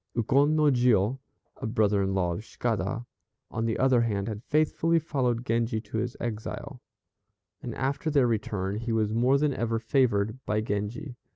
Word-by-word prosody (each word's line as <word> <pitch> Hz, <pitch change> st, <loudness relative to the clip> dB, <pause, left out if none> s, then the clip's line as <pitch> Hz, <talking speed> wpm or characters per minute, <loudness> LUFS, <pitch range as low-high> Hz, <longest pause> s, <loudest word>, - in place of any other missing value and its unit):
Ukon 140 Hz, +6 st, +3 dB
no 155 Hz, -, +3 dB
Jiô, 120 Hz, -1 st, +3 dB, 0.4 s
a -, -, -4 dB
brother 105 Hz, -3 st, +2 dB
in 95 Hz, 0 st, 0 dB
law 90 Hz, -2 st, +1 dB
of 85 Hz, -, -6 dB
Cicada, 115 Hz, -1 st, -2 dB, 0.5 s
on 115 Hz, 0 st, -2 dB
the 115 Hz, -1 st, 0 dB
other 130 Hz, -2 st, +4 dB
hand, 100 Hz, -4 st, -1 dB
had 110 Hz, -2 st, -4 dB
faithfully 155 Hz, +2 st, +2 dB
followed 125 Hz, -7 st, -1 dB
Genji 115 Hz, -1 st, 0 dB
to 110 Hz, -, -6 dB
his 120 Hz, +1 st, -3 dB
exile, 120 Hz, +3 st, -5 dB, 0.8 s
and -, -, -5 dB
after 135 Hz, +3 st, -1 dB
their 140 Hz, -4 st, +4 dB
return 105 Hz, -4 st, -1 dB
he 115 Hz, +1 st, -3 dB
was 110 Hz, -1 st, +1 dB
more 125 Hz, +4 st, +3 dB
than 145 Hz, 0 st, +1 dB
ever 115 Hz, -2 st, -1 dB
favored 115 Hz, -1 st, +1 dB
by 105 Hz, -, 0 dB
Genji. 110 Hz, +5 st, -3 dB
115 Hz, 170 wpm, -27 LUFS, 105-130 Hz, 0.8 s, other